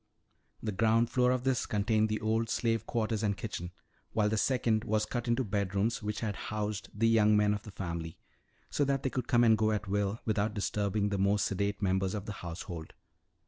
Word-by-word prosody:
The 110 - -1
ground 115 +3 +2
floor 125 -1 +3
of 125 -1 +1
this 130 -2 +1
contained 110 +1 +1
the 110 0 -1
old 110 +1 0
slave 115 -1 0
quarters 110 -2 -1
and 100 -3 0
kitchens, 95 -4 -5 0.4
while 105 -2 +2
the 110 - 0
second 110 -2 +1
was 110 -1 +1
cut 120 +2 -4
into 120 +2 +2
bedrooms 100 +1 0
which 105 0 -3
had 105 -3 -2
housed 105 0 -3
the 115 +2 +1
young 105 -2 +5
men 105 0 +3
of 105 - -3
the 105 - -11
family 85 -4 -5 0.5
so 145 - +1
that 140 -1 0
they 130 - 0
could 125 -2 -3
come 120 0 +4
and 110 -1 +6
go 110 0 +2
at 105 -1 -2
will 100 +2 0
without 105 0 0
disturbing 105 0 0
the 100 -1 -1
more 100 +2 +3
sedate 100 +1 -1
members 95 +1 +1
of 100 -1 -4
the 105 - -5
household. 85 -1 -7
105 Hz, 205 wpm, -31 LUFS, 100-115 Hz, 0.5 s, and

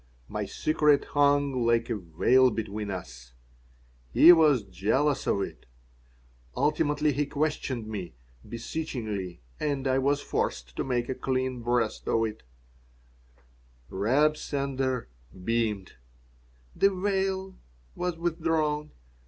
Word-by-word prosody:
My - - -3
secret 150 -2 +2
hung 145 -3 +3
like 115 0 +2
a - - +1
veil 105 +9 +3
between 105 -2 -4
us. 60 -10 -8 0.8
He 165 - +9
was 150 -8 +4
jealous 110 +10 0
of 100 - +1
it. - - -9 0.9
Ultimately 150 0 +1
he 145 +2 -1
questioned 140 -6 -2
me, 95 - -6 0.3
beseechingly, 115 - -4 0.2
and 140 -3 -1
I 130 0 +2
was 140 +2 +2
forced 60 - -3
to - - 0
make 120 -2 -1
a - - -1
clean 130 -1 -2
breast 120 -2 -1
of 115 0 +2
it 110 -1 -6 1.5
Reb 140 +10 +2
Sender 135 -4 -2 0.4
beamed. 110 -3 -1 0.8
The 195 - +4
veil 190 0 -2 0.3
was 180 -2 -3
withdrawn. 160 -3 0
130 Hz, 110 wpm, -28 LUFS, 110-150 Hz, 1.5 s, He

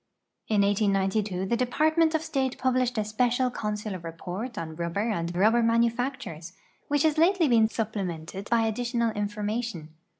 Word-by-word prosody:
In 210 -2 +2
liSD'i 200 -1 +1
the 235 - +1
Department 315 +6 +2
of 315 - 0
State 270 -5 -1
puhlished 255 -1 +1
a - - +2
Spt'cial 245 +4 +1
Consular 210 -3 -3
Rei»ort 175 +8 -6
on 160 -1 -5
ruliher 175 +7 -1
and 170 -2 -2
ruhlicr 215 +7 +3
manufactures, 230 - 0 0.3
which 290 0 +1
has 310 -1 +2
lately 345 0 +4
been 230 -4 +5
su])plemented 195 -4 -4
hy 230 -1 +3
additional 235 +1 0
information. 210 -4 -3
220 Hz, 140 wpm, -27 LUFS, 195-250 Hz, 0.3 s, been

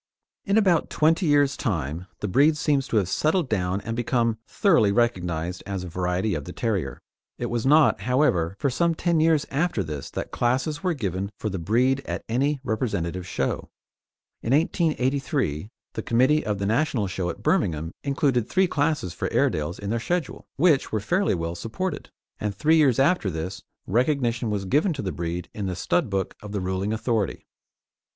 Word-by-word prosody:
In 200 +2 +2
about 185 -6 +3
twenty 165 +3 +2
years' 145 -1 +3
time, 85 - -3
the 105 - -1
breed 145 +10 +4
seems 145 -3 +1
to 115 - 0
have 100 -4 +2
settled 155 - +1
down 95 -3 -1
and 115 +1 -4
become 115 -2 0
thoroughly 140 - +3
recognised 90 -7 0
as 95 -2 -3
a 90 - -6
variety 90 +4 -1
of 75 -3 -3
the - - -7
terrier. 95 - -2 0.4
It 120 -1 -3
was 120 +1 -1
not, 150 -6 +5
however, 100 - +1
for 140 - 0
some 170 +5 +1
ten 170 0 +1
years 160 -2 +3
after 145 - 0
this 75 -4 -6
that - - -5
classes 130 +5 0
were 180 -3 0
given 100 - -3
for 110 - -3
the 95 - -3
breed 125 +9 +2
at - - -3
any 140 +5 +1
representative 90 -7 -2
show. - - -2 0.7
In 115 - 0
1883 140 - 0 0.2
the - - -3
committee 130 +6 +3
of 105 -2 -1
the 100 - -2
National 115 0 +1
Show 95 -2 -2
at 85 - -7
Birmingham 80 0 +1
included 135 -5 +1
three 190 0 +3
classes 145 - 0
for - - -3
Airedales 75 +4 0
in 100 0 -4
their 115 - 0
schedule, 175 +4 -3
which 150 -2 +3
were 110 - 0
fairly 180 - +1
well 85 0 -3
supported; 115 - -4 0.3
and 105 -1 -2
three 155 +10 +3
years 140 -7 +4
after 140 - +3
this 90 +3 -5 0.2
recognition 120 0 +1
was 100 -2 -2
given 155 - +2
to 140 - -5
the 95 - -2
breed 85 +1 -4
in 100 -2 -3
the 90 - -2
stud 130 - 0
book 95 -1 -1
of 105 -1 -8
the 100 - -1
ruling 95 +2 -2
authority. 110 -3 -1
115 Hz, 180 wpm, -25 LUFS, 95-145 Hz, 0.7 s, not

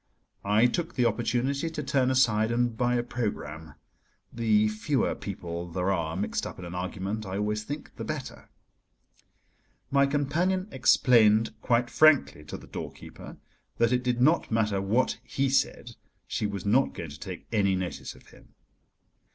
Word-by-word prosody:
I 105 +4 +4
took 165 +7 -1
the 125 - +2
opportunity 125 +6 0
to 155 -2 -5
turn 130 -1 +1
aside 110 -4 +3
and 120 -1 +1
buy 125 +1 +1
a 120 - +1
programme: 80 -11 -5 0.6
the 110 -2 +3
fewer 110 +5 0
people 85 -3 -6
there 90 +3 -1
are 85 -3 -1
mixed 100 - -2
up - - -9
in 90 - -8
an 85 - -7
argument, 95 +4 -4
I 95 -1 -4
always 105 +1 -1
think, 145 +7 -7
the - - -5
better. - - -6 1.4
My 140 0 +4
companion 165 +7 0
explained 115 -3 +4
quite 120 -1 +1
frankly 145 - +4
to 75 - -6
the - - -13
doorkeeper - - -9 0.4
that 115 0 +3
it 125 0 +2
did 125 -1 -1
not 155 +7 +3
matter 105 -3 +1
what 110 +7 +1
he 135 0 -1
said, 120 -2 0 0.3
she 105 +4 -2
was 100 -2 -5
not 125 +7 +2
going 80 -3 -6
to 70 - -11
take - - -7
any 100 -3 +2
notice 95 -1 -5
of - - -19
him. - - -20
115 Hz, 160 wpm, -27 LUFS, 100-130 Hz, 1.4 s, I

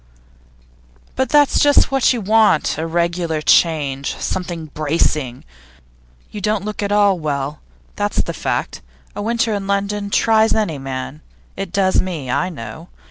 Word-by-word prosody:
'But 260 -1 0
that's 290 0 +4
just 290 -1 +4
what 270 -2 +3
you 245 -3 -1
want 210 -7 +3
a 160 - -2
regular 170 -1 -1
change, 145 -4 +2
something 175 -3 -4
bracing. 150 -4 -1 0.9
You 210 - -7
don't 210 0 0
look 215 0 -4
at 200 0 -2
all 205 -3 +3
well, 145 -1 -3 0.4
that's 205 0 0
the - - -5
fact. - - -3 0.3
A - - -4
winter 230 +1 0
in 200 -1 -3
London 200 +1 -1
tries 220 +1 +3
any 205 -10 -1
man 135 +2 -6 0.3
it 195 -2 -5
does 190 -1 +2
me, 160 -9 -4
I 185 - 0
know. 150 +2 -9
185 Hz, 145 wpm, -19 LUFS, 155-210 Hz, 0.9 s, that's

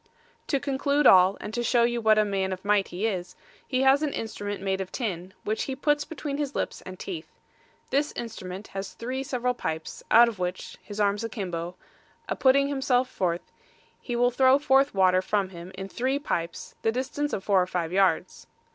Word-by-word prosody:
To 280 - +1
conclude 280 +2 0
all, 185 +1 +7
and 215 - -7
to 240 - -1
show 240 0 +3
you 240 0 +1
what 220 -1 +4
a 215 - +4
man 195 -2 -1
of 185 +1 -6
might 205 -1 +3
he 185 +5 -3
is, 185 -5 -3 0.3
he 255 0 +1
has 270 +2 +5
an 300 -2 -1
instrument 205 -2 -4
made 190 0 -1
of 190 -1 -6
tin, 185 -7 -4
which 215 +1 -1
he 265 - -3
puts 295 +1 +1
between 295 -3 -5
his 290 -2 -3
lips - - -3
and 185 0 -9
teeth; 170 -4 -6 0.6
this 285 +2 +1
instrument 195 -4 -7
has 195 0 -6
three 255 +3 -4
several 250 -3 -1
pipes, 160 -9 -5
out 235 +1 +8
of 220 -5 -5
which, 180 0 -4
his 205 0 -8
arms 205 +1 +1
a 230 - -3
kimbo, 175 -5 -4 0.5
a - - -1
putting 275 +1 +4 0.2
forth 255 -1 +2
himself, - - -17 0.8
he 240 - -4
will 245 +1 +3
throw 260 +2 +5
forth 275 -3 +3
water 185 -1 +4
from 195 0 0
him 175 0 -10
in 195 0 -6
three 260 +7 -1
pipes, 170 -12 -4
the 225 - +2
distance 265 +4 -2
of 190 - -3
four 195 -3 +3
or 180 - 0
five 175 -3 -2
yards. 190 0 +1
220 Hz, 200 wpm, -27 LUFS, 190-260 Hz, 0.8 s, out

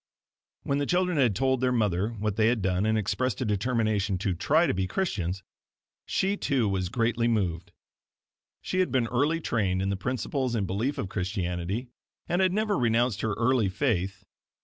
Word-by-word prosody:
When 140 0 0
the 145 - -1
children 180 -3 +1
had 120 -7 +3
told 130 +1 +1
their 130 -1 +2
mother 105 -4 +1
what 105 -3 -3
they 110 0 +3
had 115 -4 +1
done 95 +2 +1
and 110 0 +2
expressed 125 +5 -1
a 130 - -1
determination 105 -2 0
to 95 0 -1
try 155 - +3
to - - +1
be 95 0 -1
Christians; 95 - -2 0.6
she, 195 +1 +1
too, 130 - +1
was 95 -2 -1
greatly 115 0 +1
moved. 90 -7 -1 0.9
She 185 - -1
had 185 - +2
been 130 -3 +2
early 145 +8 +1
trained 100 - 0
in 95 +1 0
the 100 - 0
principles 125 +4 -2
and 105 -3 0
belief 110 +10 -1
of - - -2
Christianity, 95 +3 -3 0.4
and 175 +2 +1
had 185 -1 +3
never 210 -1 0
renounced 115 -2 +2
her 110 -2 0
early 115 -2 +2
faith. 95 -4 -1
115 Hz, 180 wpm, -27 LUFS, 95-130 Hz, 0.9 s, had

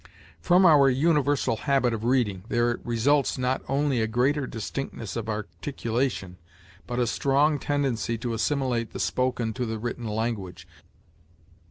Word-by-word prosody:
From 180 +1 +4
our 145 -5 +7
universal 145 -3 +2
habit 135 -3 +1
of 110 -1 -4
reading, 115 -7 +1
there 120 0 +1
results 135 +6 +1
not 130 +1 0
only 135 -3 +1
a 110 - +1
greater 130 +5 +1
distinctness 115 -1 -5
of 115 -1 -4
articulation, 110 -2 -3 0.5
but 120 - -4
a 125 - +2
strong 140 +6 +2
tendency 135 -6 -1
to 115 +1 -3
assimilate 120 -1 -1
the - - -5
spoken 125 -3 -1
to 125 - -3
the 110 0 -3
written 120 +1 -4
language. 105 -5 -3
125 Hz, 140 wpm, -26 LUFS, 115-140 Hz, 0.5 s, our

